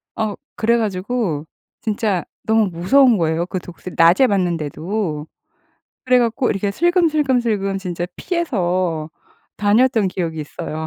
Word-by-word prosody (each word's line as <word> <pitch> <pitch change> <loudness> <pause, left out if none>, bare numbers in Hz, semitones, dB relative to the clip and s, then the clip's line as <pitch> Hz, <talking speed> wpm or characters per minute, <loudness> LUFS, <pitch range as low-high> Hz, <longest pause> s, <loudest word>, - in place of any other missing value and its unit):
어 215 -2 -2 0.2
그래 235 +1 +2
가지고 195 -6 -2 0.4
진짜 210 -4 -1 0.2
너무 220 -1 +3
무서운 225 +8 +4
거예요 165 0 0
그 185 - -3
독수리 180 +1 -10
낮에 175 +11 +6
봤는데도. 170 -2 -2 0.8
그래 255 -1 +4
갖고 240 +2 +1
이렇게 200 0 -1
슬금슬금슬금 260 - +1
진짜 175 -2 -4
피해서 185 - -1 0.5
다녔던 220 +1 +3
기억이 170 -3 -3
있어요. 155 +1 -5
200 Hz, 295 characters per minute, -20 LUFS, 175-235 Hz, 0.8 s, 낮에